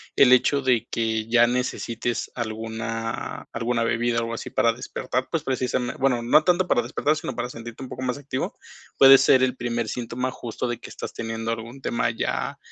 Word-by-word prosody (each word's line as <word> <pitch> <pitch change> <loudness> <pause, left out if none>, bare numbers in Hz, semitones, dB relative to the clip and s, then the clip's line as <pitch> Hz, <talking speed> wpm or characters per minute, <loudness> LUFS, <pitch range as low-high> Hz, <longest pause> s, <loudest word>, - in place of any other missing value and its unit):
el 130 -2 +7
hecho 140 +2 +4
de 125 -4 +2
que 110 -1 -1
ya 120 0 +6
necesites 120 -1 -2
alguna 115 0 -4
alguna 120 0 0
bebida 115 +1 +1
o - - +2
algo 115 0 -3
así 115 - -5
para 115 - +2
despertar, 125 +1 -3
pues, 165 -3 -1
precisame 130 -2 -1
bueno, 125 -3 +2
no 150 +6 +5
tanto 180 +2 +2
para 120 - +3
despertar, 140 +5 0
sino 130 -5 -5
para 120 +1 -3
sentirte 115 +2 -9
un 130 - -8
poco 130 - -7
más 125 0 -1
activo, 140 -2 -4 0.4
puede 135 0 +9
ser 130 -1 +5
el 130 -1 +1
primer 120 -2 -2
síntoma, 125 +3 -3
justo, 120 0 -5
de 120 -1 -3
que - - -10
estás - - -7
teniendo 115 0 -3
algún 115 +3 -6
tema 120 -3 0
ya, 115 - -2
120 Hz, 195 wpm, -24 LUFS, 115-130 Hz, 0.4 s, puede